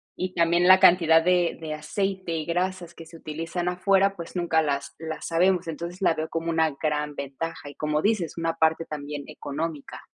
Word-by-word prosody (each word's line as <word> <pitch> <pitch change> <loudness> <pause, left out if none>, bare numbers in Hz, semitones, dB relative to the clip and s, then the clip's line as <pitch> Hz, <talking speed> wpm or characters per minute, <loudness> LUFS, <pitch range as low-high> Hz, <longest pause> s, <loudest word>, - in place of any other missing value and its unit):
y 185 0 -4
también 170 +1 +3
la 185 0 +8
cantidad 170 -3 +6
de 180 -1 +2
de 155 -1 -5
aceite 190 +3 -3
y 155 - -3
grasas 175 0 -2
que 165 - -11
se 165 +1 -13
utilizan 165 +3 -4
afuera, 195 +2 +2
pues, 170 0 -9
nunca 170 -2 +2
las 140 -2 -2
las 160 -1 -5
sabemos. 180 +1 +2
Entonces, 170 +3 -6
la 175 - +4
veo 155 0 -3
como 165 0 -3
una 160 -1 +2
gran 150 -1 -1
ventaja, 140 +2 -6
y 145 - -12
como 150 0 -1
dices, 200 -7 0
una 165 0 -1
parte 160 0 +2
también 145 -1 -6
económica. 150 0 -6
165 Hz, 190 wpm, -25 LUFS, 155-180 Hz, -, la